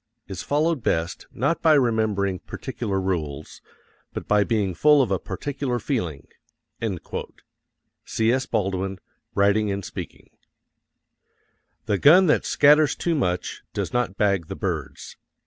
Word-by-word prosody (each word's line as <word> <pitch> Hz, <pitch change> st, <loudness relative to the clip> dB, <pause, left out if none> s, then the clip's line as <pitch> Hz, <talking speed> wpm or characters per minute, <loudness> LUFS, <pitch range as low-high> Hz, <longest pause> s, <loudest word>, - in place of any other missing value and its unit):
is 95 Hz, -2 st, -6 dB
followed 150 Hz, 0 st, 0 dB
best, 85 Hz, -3 st, -1 dB
not 140 Hz, +8 st, -1 dB
by 160 Hz, -, +5 dB
remembering 110 Hz, -8 st, +1 dB
particular 95 Hz, -1 st, -4 dB
rules, 80 Hz, -6 st, -4 dB, 0.5 s
but -, -, -6 dB
by 105 Hz, -1 st, +4 dB
being 100 Hz, -4 st, 0 dB
full 150 Hz, -, +5 dB
of 125 Hz, -7 st, +2 dB
a 95 Hz, -, +1 dB
particular 130 Hz, +5 st, -3 dB
feeling. 90 Hz, -, -3 dB, 1.8 s
C.S. 120 Hz, +4 st, 0 dB
BALDWIN, 95 Hz, -3 st, -1 dB, 0.4 s
Writing 100 Hz, +1 st, +3 dB
and 100 Hz, -1 st, -3 dB
Speaking. -, -, -9 dB, 1.5 s
The 100 Hz, -2 st, 0 dB
gun 180 Hz, +6 st, +7 dB
that 150 Hz, -, +2 dB
scatters 150 Hz, 0 st, +5 dB
too 170 Hz, -, -1 dB
much 90 Hz, -, -2 dB
does -, -, -3 dB
not 120 Hz, -6 st, -1 dB
bag 100 Hz, -5 st, +1 dB
the -, -, -6 dB
birds. -, -, -5 dB
105 Hz, 125 wpm, -24 LUFS, 95-140 Hz, 1.8 s, gun